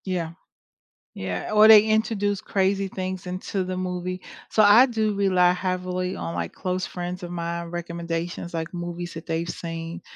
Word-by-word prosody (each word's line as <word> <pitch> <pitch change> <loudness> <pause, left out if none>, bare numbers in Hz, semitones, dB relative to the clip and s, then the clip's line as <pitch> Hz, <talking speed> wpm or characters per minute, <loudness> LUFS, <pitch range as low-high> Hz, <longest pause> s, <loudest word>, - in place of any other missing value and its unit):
Yeah. 175 -4 -2 0.8
Yeah, 90 -2 -4
or 215 0 +8
they 215 -1 +10
introduce 215 -2 +1
crazy 195 0 +1
things 185 -1 -5
into 185 +1 -3
the 185 0 -4
movie 185 0 -3 0.3
so 215 - +4
I 215 +6 +8
do 220 -3 0
rely 185 -3 +4
heavily 185 0 -2
on 85 0 -4
my 85 -1 -2
close 185 - -3
friends 180 +1 -5
of 175 - -6
mine 170 0 -3
recommendations, 170 0 -4
like 165 0 -4
movies 175 0 -5
that 165 0 -9
they've 165 0 -1
seen. 165 0 -5
180 Hz, 160 wpm, -25 LUFS, 170-195 Hz, 0.8 s, they